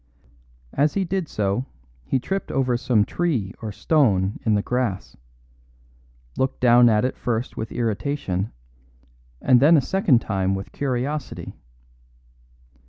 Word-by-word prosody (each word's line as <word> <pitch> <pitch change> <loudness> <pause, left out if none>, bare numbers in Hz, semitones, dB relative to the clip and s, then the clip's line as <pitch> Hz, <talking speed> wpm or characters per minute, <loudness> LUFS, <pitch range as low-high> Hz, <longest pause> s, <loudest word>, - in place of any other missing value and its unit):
As 145 +1 +1
he 195 -1 +1
did 185 -1 -2
so 105 +5 -1 0.4
he 130 - 0
tripped 195 +10 -3
over 130 -2 +1
some 120 -4 +2
tree 130 - -1
or 110 -2 -4
stone 105 - +1
in 110 -2 +2
the 100 - 0
grass; 120 -6 -2 1.2
looked 130 0 -1
down 120 -1 +6
at 110 +2 +2
it 130 - -2
first 120 0 -3
with 110 - -5
irritation 110 -4 -2 0.9
and 125 -1 +5
then 155 +5 +6
a - - +6
second 175 -3 +2
time 95 -3 -1
with 95 0 -6
curiosity. 140 +2 -3
125 Hz, 130 wpm, -23 LUFS, 105-140 Hz, 1.2 s, down